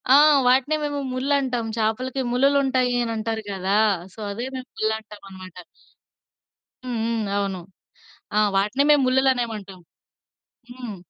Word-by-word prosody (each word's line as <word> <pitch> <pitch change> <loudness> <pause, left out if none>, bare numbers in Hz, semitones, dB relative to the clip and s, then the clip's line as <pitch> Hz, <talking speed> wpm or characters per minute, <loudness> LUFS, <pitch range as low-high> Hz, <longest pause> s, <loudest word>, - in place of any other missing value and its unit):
ఆహ్, 295 0 +7
వాటినే 265 +4 +3
మేము 290 -1 -2
ముళ్ళంటాం. 260 -2 0
చేపలకి 255 +5 -1
ముళ్ళు‌లు 275 +3 +3
ఉంటాయి 255 -2 +1
అని 230 - -3
అంటారు 220 0 -3
కదా! 195 +1 0 0.4
సో - - -15
అదే 235 +5 -4
మేము 255 0 -7
ముళ్ళుంటామనమాట. 205 -4 -5 1.3
హ్మ్ 245 -2 -3
హ్మ్. 225 -2 -1
అవును. 195 -2 -2 0.8
ఆ! - - +5 0.2
వాటినే 210 +8 +2
మేము 295 -1 +6
ముళ్ళు‌లనేమంటాం. 240 -7 0 0.9
హ్మ్. 245 -4 -7
240 Hz, 120 wpm, -23 LUFS, 210-265 Hz, 1.3 s, ఆహ్